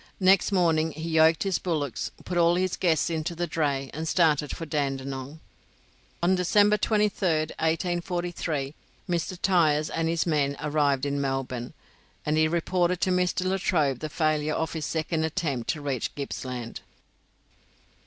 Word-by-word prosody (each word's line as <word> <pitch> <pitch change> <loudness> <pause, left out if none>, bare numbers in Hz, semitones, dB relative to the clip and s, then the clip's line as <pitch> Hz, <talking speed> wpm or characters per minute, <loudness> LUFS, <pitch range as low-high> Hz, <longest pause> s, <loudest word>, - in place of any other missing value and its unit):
Next 190 +1 +4
morning 165 -4 +2
he 160 +2 -5
yoked 160 0 +4
his 195 -2 0
bullocks, 150 -8 -2 0.2
put 180 - -4
all 170 0 +4
his 185 0 0
guests 170 -2 +1
into 160 +1 -2
the 175 +1 -1
dray, 145 -5 -1
and 160 +2 -4
started 155 -4 +2
for 165 - -5
Dandenong. 140 -1 -3 0.8
On 180 +2 +4
December 205 +3 +4
23rd, 195 -8 +1
1843, 175 -3 -1 0.3
Mr. 175 +1 -2
Tyers 155 -6 +2
and 165 0 0
his 165 -1 0
men 145 -4 +1
arrived 145 -2 +1
in 140 0 -1
Melbourne, 135 -3 -3 0.5
and 150 - +1
he 155 0 +4
reported 175 +2 0
to 185 - +2
Mr. 180 0 +1
Latrobe 170 -8 +1
the 155 - -4
failure 155 -1 0
of 160 0 -2
his 160 -2 -3
second 160 0 -1
attempt 150 -8 -2
to 150 - -1
reach 135 -5 -3
Gippsland. 125 -4 -5
160 Hz, 145 wpm, -26 LUFS, 145-175 Hz, 0.8 s, Next